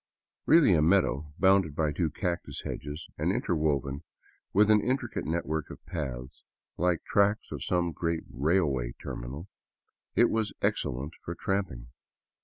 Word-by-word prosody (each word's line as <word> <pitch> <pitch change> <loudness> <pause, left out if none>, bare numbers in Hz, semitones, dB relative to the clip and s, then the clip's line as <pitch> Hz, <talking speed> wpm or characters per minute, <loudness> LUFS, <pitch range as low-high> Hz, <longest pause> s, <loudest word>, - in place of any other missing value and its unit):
Really 155 - +7
a 80 - +4
meadow, 75 -4 +2
bounded 95 -6 +4
by 75 -1 +1
two 80 +2 0
cactus 85 +3 -3
hedges 75 +3 -5
and - - +2
interwoven 70 -4 0 0.5
with 105 +2 +5
an 105 -1 +5
intricate 125 0 -1
network 80 -2 -2
of - - -11
paths, 65 -7 -5 0.3
like 90 -1 +1
the - - -24
tracks 100 +1 +2
of - - -4
some 85 -1 +1
great 85 0 -2
railway 70 -5 +1
terminal, 70 +9 -6 0.7
it - - +5
was 110 -2 0
excellent 70 +6 -1
for 85 - -5
tramping. 90 -14 -2
80 Hz, 140 wpm, -29 LUFS, 70-95 Hz, 0.7 s, Really